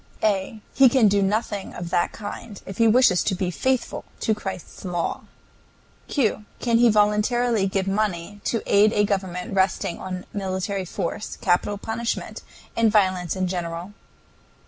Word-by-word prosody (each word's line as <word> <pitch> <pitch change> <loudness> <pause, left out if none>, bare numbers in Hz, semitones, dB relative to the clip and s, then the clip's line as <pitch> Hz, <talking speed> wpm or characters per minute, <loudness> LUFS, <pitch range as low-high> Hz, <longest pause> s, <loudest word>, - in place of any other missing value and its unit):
A. 210 +1 0
He 270 -2 +7
can 235 -3 +5
do 200 0 +3
nothing 205 0 -1
of 175 -1 -6
that 175 -1 +1
kind 205 0 -8
if 195 - -8
he 230 - +5
wishes 225 -5 +5
to 195 - 0
be 180 -1 -1
faithful 260 +7 -1 0.2
to 220 - +2
Christ's 190 -4 -7
law. 175 -3 -2 0.8
Q. 220 -6 0
Can 235 -1 +2
he 240 0 +6
voluntarily 210 +1 +2
give 190 0 -1
money 200 -1 -2
to 230 - 0
aid 210 +2 +4
a 205 - +3
government 190 -3 -2
resting 190 -2 0
on 185 -1 -5
military 190 0 -2
force, 175 +4 -4
capital 195 +3 +1
punishment, 225 +3 -3 0.3
and 230 -2 +3
violence 185 -5 +2
in 185 -1 0
general? 175 +1 -4
200 Hz, 150 wpm, -24 LUFS, 185-220 Hz, 0.8 s, He